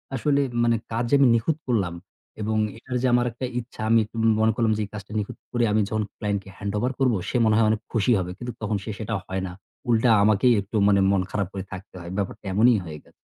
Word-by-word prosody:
আসলে 140 +2 +2 0.2
মানে 115 0 +3 0.2
কাজ 115 +1 0
যে 145 - +4
আমি 135 - +6
নিখুঁত 135 +7 0
করলাম 100 -8 0 0.5
এবং 110 +1 -1 0.2
এটার 125 +2 -4
যে 130 - +2
আমার 120 0 +3
একটা 120 +3 -5
ইচ্ছা 120 -2 -10
আমি 115 0 +6
একটু 105 - -20 0.3
মনে 110 0 +4
করলাম 115 -1 +2
যে - - -1
এই - - -15
কাজটা 105 -1 -8
নিখুঁত 105 - -5
করে 120 -1 +1
আমি 110 +1 +3
যখন 110 0 0
ক্লায়েন্ট 100 -1 -1
কে 95 - -13
হ্যান্ডওভার 105 +5 -1
করবো 125 -5 +3
সে - - 0
মনে 110 -1 +3
হয় 110 -1 +4
অনেক 110 0 0
খুশি 115 +2 +2
হবে 90 -1 -3
কিন্তু 120 +2 -5
তখন 105 -1 -1
সে 110 - -5
সেটা 110 0 -4
হয় 95 0 -3
না। - - -7 0.4
উল্টা 115 +1 +3
আমাকেই 110 +4 +4
একটু 100 +3 -9
মানে 100 -1 +4
মন 100 -2 +2
খারাপ 100 -3 -1
করে 95 -1 -4
থাকতে 95 +1 -9
হয় 85 0 -8
ব্যাপারটা 100 +1 -4
এমনই 115 +4 +5
হয়ে 80 -2 -7
গে - - -22
110 Hz, 240 wpm, -24 LUFS, 100-120 Hz, 0.5 s, আমি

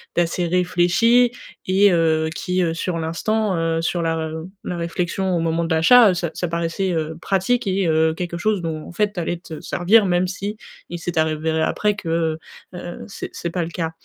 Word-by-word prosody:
d'assez 175 +1 +1
réfléchi 180 +7 +3 0.3
et 195 +2 +4
heu, 160 -2 +2
qui, 180 +2 -1
heu, 165 -1 0
sur 170 +1 -2
l'instant, 190 +6 -1
heu, 165 0 0
sur 170 +1 -1
la 165 -1 0
r 160 -1 -3 0.3
la 180 - -4
réflexion 175 +2 -1
au - - +1
moment 165 0 0
de 165 - 0
l'achat, 225 +8 +7
heu, - - 0
ça 175 -1 -2
ça 175 - -3
paraissait, 170 +3 -1
heu, 160 0 -2
pratique 200 +6 0
et 190 -2 +1
heu, 160 0 +3
quelque 170 +1 -4
chose 210 +1 0
dont, 160 -2 -4
en - - -9
fait, 210 +2 +1
tu 180 - -4
allais 175 0 -2
te 165 -3 -9
servir 200 +5 +3
même 180 0 +1
s'il 200 +3 -4 0.4
s'est 170 0 -5
avéré 160 0 0
après 210 +6 +1
que, 190 - -8
heu 165 -1 0 0.3
heu, 175 -1 -7
c'est 195 - -7
c'est 170 - -4
pas 175 0 -2
le 165 - -5
cas. 165 -2 -3
175 Hz, 205 wpm, -21 LUFS, 165-190 Hz, 0.4 s, l'achat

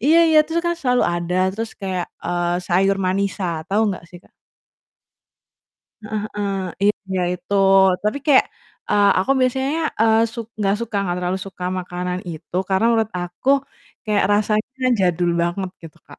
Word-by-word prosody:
iya 315 +4 +5
iya, 310 - +6
terus 330 +1 -1
kan 345 - +1
selalu 250 -1 +2
ada 175 0 -2 0.2
terus 225 +1 -4
kayak, 185 -3 -3 0.2
eee, 175 0 0
sayur 195 +2 +2
manisa, 185 -3 -1
tau 210 +2 +3
nggak 185 -3 -6
sih, 175 - -11
Kak? - - -25 1.7
Heeh 215 0 -3
heeh, 205 -1 -2 0.6
iya, 185 - 0
itu. 180 +3 -5 0.5
Tapi 210 +6 0
kayak, 285 -3 +6 0.5
eee, 205 -1 +4
aku 195 - -2
biasanya, 265 +5 0 0.2
eee, 220 0 +4
suk 230 -2 -6
nggak 200 -1 +1
suka, 230 -2 -4
nggak 175 -2 -2
terlalu 180 +1 -1
suka 185 -2 -8
makanan 180 0 -4
itu, 160 +1 -11
karena 190 +2 +1
menurut 225 -2 +1
aku, 175 +8 -6 0.6
kayak 210 -3 +1
rasanya 215 +5 0
jadul 175 -1 +2
banget 180 +2 -2
gitu, 160 -3 -12
Kak. - - -14
195 Hz, 155 wpm, -21 LUFS, 180-225 Hz, 1.7 s, iya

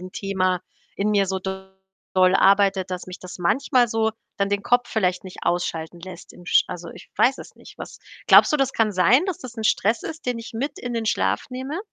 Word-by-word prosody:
'n 185 0 -9
Thema 185 -3 -1 0.4
in 210 +1 0
mir 200 -2 +2
so 190 0 -2
doll 190 0 -7 0.6
arbeitet, 195 -1 +3
dass 180 0 -5
mich 185 - -9
das 185 0 -10
manchmal 250 +7 +2
so 225 0 +1 0.3
dann 200 0 0
den 200 0 -1
Kopf 245 0 +2
vielleicht 185 -4 0
nicht 185 - -10
ausschalten 170 -1 -2
lässt 180 0 -11
im 175 - -15
Sch - - +4
also, 175 -2 -7
ich - - -14
weiß 260 +2 +3
es - - -11
nicht, - - -16
was - - -9 0.3
glaubst - - +7
du, - - +4
das 270 -1 0
kann 220 -2 +1
sein, 225 - +4
dass 375 - -3
das 250 -2 -10
'n 220 - -5
Stress 220 +2 +1
ist, 315 -4 -8
den 245 -2 -1
ich 230 - -9
mit 275 +6 -3
in 245 -1 -5
den 225 -1 -2
Schlaf - - 0
nehme? 265 +6 -5
200 Hz, 220 wpm, -23 LUFS, 185-240 Hz, 0.6 s, glaubst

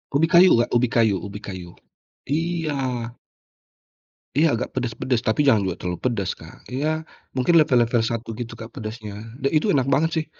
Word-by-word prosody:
Ubi 165 +3 +4
kayu, 180 +1 +7
Kak. 120 - +1
Ubi 125 +1 +3
kayu 110 -4 +3
ubi 100 0 -7
kayu. 90 -4 -8 0.6
Iya. 165 +1 -1 1.7
Iya 160 +2 +5
agak 125 - -3
pedes-pedes 120 0 -1
tapi 110 +7 +2
jangan 115 -7 +4
juga 90 - -2
terlalu 90 0 -3
pedes, 115 -7 0
Kak. - - -14
Ya 155 +4 -1 0.3
mungkin 130 +7 +2
level 150 -5 +4
level 115 0 +1
1 115 0 -3
gitu, 120 -1 -5
Kak, 110 +1 -10
pedasnya 110 -1 -7 0.3
dan 135 - +2
itu 155 +7 +2
enak 135 -1 +1
banget 160 +3 +3
sih. 160 - 0
125 Hz, 175 wpm, -23 LUFS, 110-155 Hz, 1.7 s, kayu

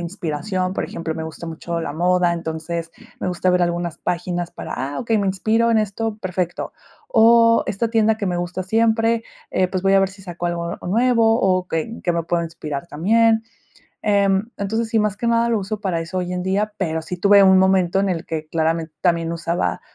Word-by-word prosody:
inspiración, 185 +2 -3
por - - -2
ejemplo, 165 -1 -5
me 160 - -5
gusta 160 +1 -7
mucho 170 +1 -4
la 160 - -4
moda, 175 +2 +2
entonces, 165 0 -4 0.3
me - - -1
gusta 180 +1 -1
ver 180 0 +3
algunas 175 -1 -1
páginas 175 0 -2
para - - -7
"ah, 140 +2 -4
okey, 225 -3 +1
me 200 - 0
inspiro 220 +5 +1
en 230 - +3
esto, 215 +1 -2
perfecto". 180 -2 -3 0.4
O 230 - +5
esta 225 +4 -1
tienda 220 -1 +2
que 200 - -2
me 180 -1 -1
gusta 175 +1 -3
siempre, 225 +2 +2 0.3
eh, 185 -1 +2
pues, 185 0 -3
voy 195 - +4
a 195 - +6
ver 195 - +2
si 195 0 -15
saco 175 -1 -5
algo, 170 0 -3
o - - -8
nuevo 230 +1 +3
o 185 -1 +1
que 160 -1 0
en 230 - -9
que 175 - 0
me 170 -1 -1
puedo 170 0 0
inspirar 165 -2 -6
también, 225 +7 +2 0.6
em. 200 +1 +2
Entonces 220 +3 -2
sí, 225 0 +1
más 210 -1 0
que 235 +3 -1
nada 235 0 +2
lo 225 -3 +1
uso 210 +2 -4
para 185 -5 -1
eso 170 +3 -4
hoy 180 0 -3
en 180 - -2
día, 200 +3 0
pero 160 -4 -1
sí 170 +3 -5
tuve 200 +2 +6
un 190 0 +6
momento 190 -1 +3
en 195 - +1
el 170 -3 -2
que 155 -1 -4
claramente 160 0 -1
también 170 -1 +1
usaba 170 +1 -2
185 Hz, 215 wpm, -21 LUFS, 170-215 Hz, 0.6 s, a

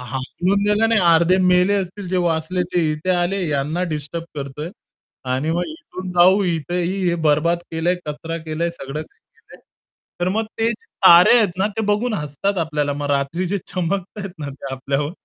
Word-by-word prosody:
हाकलून 135 +10 -1
द्यायला 210 +2 +3
नाही, 225 -1 +3
अर्धे 170 +1 +4
मेले 180 +1 +4
असतील 190 -1 -3
ते 185 - +1
वाचले 175 +1 0
ते 175 - +3
इथे 155 +5 -3
आले, 180 +2 +1
यांना 150 +4 -1
डिस्टर्ब 150 +3 -4
करतोय. 145 +3 -6 0.5
आणि 130 +4 -1
मग 170 +2 0
इथून 315 - -8
जाऊ 185 +3 +5
इथंही 175 +2 -1
हे 170 - +2
बरबाद 155 +3 +3
केलंय, 165 +2 +1
कचरा 160 +2 -4
केलंय, 165 +2 -2
सगळं 150 -2 -6
काही - - -22 0.2
केलंय - - -17 0.6
तर 175 - +1
मग 220 +4 0
ते 225 +1 +2
तारे 190 -2 +6
आहेत 220 -4 +4
ना, 195 - +2
ते 225 - 0
बघून 210 +3 +1
हसतात 165 +4 -2
आपल्याला 150 -3 -1
मग 145 0 -4
रात्री 140 +6 0
जे 200 +3 -1
चमकताहेत 195 +2 -3
ना 145 -2 -5
ते 135 0 -8
आपल्यावर 135 +2 -2
175 Hz, 175 wpm, -21 LUFS, 150-190 Hz, 0.6 s, तारे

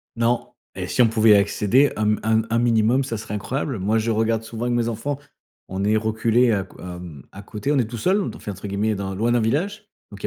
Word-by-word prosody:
Non. 115 +1 0 0.2
Et - - -4
si - - +1
on 120 - +6
pouvait 110 -1 +5
accéder 105 +7 +3
un 110 - -1
m 105 0 +2
un 110 - +1
m 110 - -4
un 115 - +2
minimum 120 +2 +3
ce 115 -4 -4
serait 105 -1 -7
incroyable. 125 +4 -3
Moi 105 +4 +1
je 115 +1 0
regarde 110 0 +1
souvent 115 +1 -5
avec 120 0 0
mes 120 -1 0
enfants. 130 +5 -3 0.5
On 95 +1 -3
est 105 +2 +2
reculés 110 +2 +2
à 100 -3 +1
q 95 - -17
à 90 -1 -7
mmh, 80 -7 -10
à 100 - -10
côté, 105 +6 -4
on 150 - +2
est 120 - +1
tout 120 - -6
seuls, 190 - +1
te - - -9
f - - -17
entre 100 +1 -6
guillemets 100 +2 0
«dans 95 -1 -4
loin 115 +5 +1
d'un 120 - +3
village» 200 - -1 0.2
donc 100 - -11
il - - -4
110 Hz, 265 wpm, -22 LUFS, 105-120 Hz, 0.5 s, on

